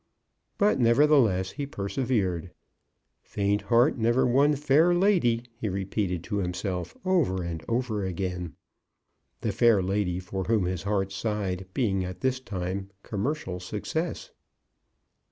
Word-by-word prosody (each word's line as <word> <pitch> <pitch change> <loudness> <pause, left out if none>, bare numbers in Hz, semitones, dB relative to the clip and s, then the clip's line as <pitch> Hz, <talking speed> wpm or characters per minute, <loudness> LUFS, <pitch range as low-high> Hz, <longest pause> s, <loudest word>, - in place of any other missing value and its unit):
But 205 -8 +3
nevertheless 115 -6 +4
he 140 -1 -5
persevered. 100 - -1 0.7
"Faint 100 0 -1
heart 120 +3 +3
never 120 +3 +3
won 140 +4 +4
fair 150 +5 +4
lady," 175 - +3
he 115 -2 -3
repeated 95 -2 -2
to 105 +1 -3
himself, 90 -1 -3
over 150 - +2
and 85 -2 -5
over 115 -3 -1
again, 90 -2 -3 0.9
the - - 0
fair 115 -4 +4
lady 95 -1 0
for 95 +1 -4
whom 110 -3 +2
his 90 -1 -2
heart 100 -1 -1
sighed 95 -3 -2
being 95 -7 +1
at 90 0 -7
this 130 -1 +1
time 95 -3 -4
Commercial 105 -3 -3
Success. 160 - -4
105 Hz, 125 wpm, -27 LUFS, 95-130 Hz, 0.9 s, nevertheless